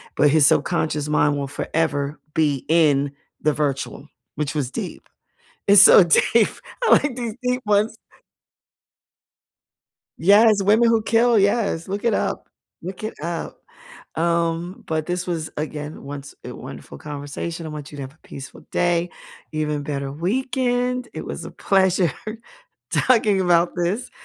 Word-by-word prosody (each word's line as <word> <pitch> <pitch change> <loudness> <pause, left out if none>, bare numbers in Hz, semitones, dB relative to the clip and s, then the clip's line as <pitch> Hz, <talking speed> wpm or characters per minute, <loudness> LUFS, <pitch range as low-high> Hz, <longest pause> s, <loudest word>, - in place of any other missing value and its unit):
but 150 - +4
his 150 -1 +5
subconscious 155 -3 +1
mind 145 -1 +2
will 140 - -3
forever 145 0 -2 0.2
be 145 -4 +1
in 145 -4 +3 0.3
the 150 -1 +2
virtual, 140 -3 -3 0.3
which 150 0 -2
was 135 -5 -1
deep. - - -6 0.6
It's 200 0 +8
so 200 - +9
deep. 210 +6 +4 0.4
I - - +3
like 290 -3 +4
these 235 -3 -3
deep 250 0 0
ones 210 +2 +2 2.3
Yes, 205 +2 +5
Women 220 +4 +4
Who 225 -1 +3
Kill, 230 +1 +3
yes, 200 -4 +1
look 200 +2 -4
it 235 - +2
up. - - -2 0.3
Look 185 +4 -7
it 215 - -3
up. 170 0 -4 0.6
Um, 170 +1 -1
but 155 -1 -1
this 180 0 -3
was, 165 -3 -3
again, 150 0 -5
once, 140 0 -8
a - - -7
wonderful 70 - -10
conversation. 150 - -6
I - - -6
want 150 -1 -8
you 145 - -10
to 140 - -6
have 135 +2 -9
a - - -25
peaceful 135 -1 -10
day, 175 0 +1 0.4
even 150 -1 -2
better 140 -1 -4
weekend. 250 - -1
It - - -6
was - - -6
a - - -8
pleasure 190 -3 +2 0.8
talking 215 -6 +3
about 175 -1 +3
this. 180 +8 -2
170 Hz, 145 wpm, -22 LUFS, 150-205 Hz, 2.3 s, so